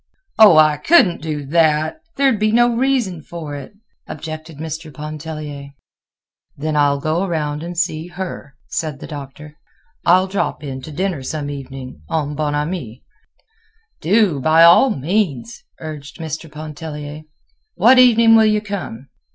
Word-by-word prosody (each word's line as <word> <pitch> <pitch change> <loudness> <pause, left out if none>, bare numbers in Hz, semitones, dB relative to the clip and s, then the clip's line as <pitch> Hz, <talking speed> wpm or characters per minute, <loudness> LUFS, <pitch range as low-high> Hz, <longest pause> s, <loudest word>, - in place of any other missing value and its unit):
"Oh! 205 -7 +8
I 155 -1 +5
couldn't 190 - +4
do 150 -2 -4
that; 155 - +2 0.2
there'd 270 -6 +2
be 215 0 +2
no 240 +1 +3
reason 240 -9 0
for 155 -2 -8
it," 145 +7 -9 0.3
objected 155 0 -8
Mr. 160 +1 -6
Pontellier. 150 -1 -7 0.8
"Then 155 +2 -2
I'll 145 -1 +2
go 155 +5 -1
around 150 -5 -2
and 175 +1 -7
see 165 -1 -1
her," 175 -6 -7
said 155 -4 -4
the - - -8
Doctor. 150 +1 -10 0.4
"I'll 185 +2 +4
drop 190 -5 -3
in 135 -2 -6
to 155 - -9
dinner 180 -1 -2
some 145 +1 -4
evening 135 - -8
en 150 -2 -1
bon 150 0 -2
ami." 145 -6 -4 1.0
"Do! 190 -4 +2
by 160 +4 +5
all 170 +11 +7
means," 145 - -2 0.2
urged 150 -3 -8
Mr. 160 -1 -6
Pontellier. 150 -1 -7 0.5
"What 255 +2 +6
evening 230 -2 +6
will 220 -1 +6
you 215 0 +2
come? 190 - -6
155 Hz, 145 wpm, -19 LUFS, 145-185 Hz, 1.0 s, Oh